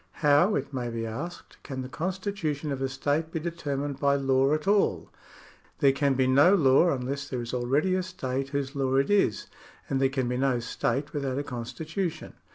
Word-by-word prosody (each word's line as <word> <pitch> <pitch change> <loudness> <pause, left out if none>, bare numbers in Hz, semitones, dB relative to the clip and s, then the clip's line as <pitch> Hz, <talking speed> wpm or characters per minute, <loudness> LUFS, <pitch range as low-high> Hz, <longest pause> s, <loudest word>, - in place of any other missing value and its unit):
How, 150 +8 +5
it 140 +1 -3
may 125 -2 -2
be 115 -1 -3
asked, 145 +11 -7
can 130 -2 -5
the - - -6
constitution 170 -2 -3
of 135 -1 -3
a 135 - 0
state 145 +4 -1
be 165 - -2
determined 145 -4 -3
by 140 0 +3
law 135 0 +2
at 155 +3 -1
all? 205 0 +2 0.7
There 140 - +5
can 135 0 +1
be 130 0 +2
no 145 +9 +6
law 150 0 +5
unless 140 0 -3
there 125 - -3
is 120 - -7
already 135 +9 +1
a 185 - +1
state 135 -7 -4
whose 140 0 -3
law 135 -1 0
it 135 +7 +2
is, 200 - +2 0.5
and 135 0 +1
there 135 - +4
can 130 -2 -1
be 125 0 -1
no 130 -2 +1
state 120 +4 -2
without 135 -3 -2
a 145 - -1
constitution. 155 +8 -4
140 Hz, 195 wpm, -27 LUFS, 130-155 Hz, 0.7 s, no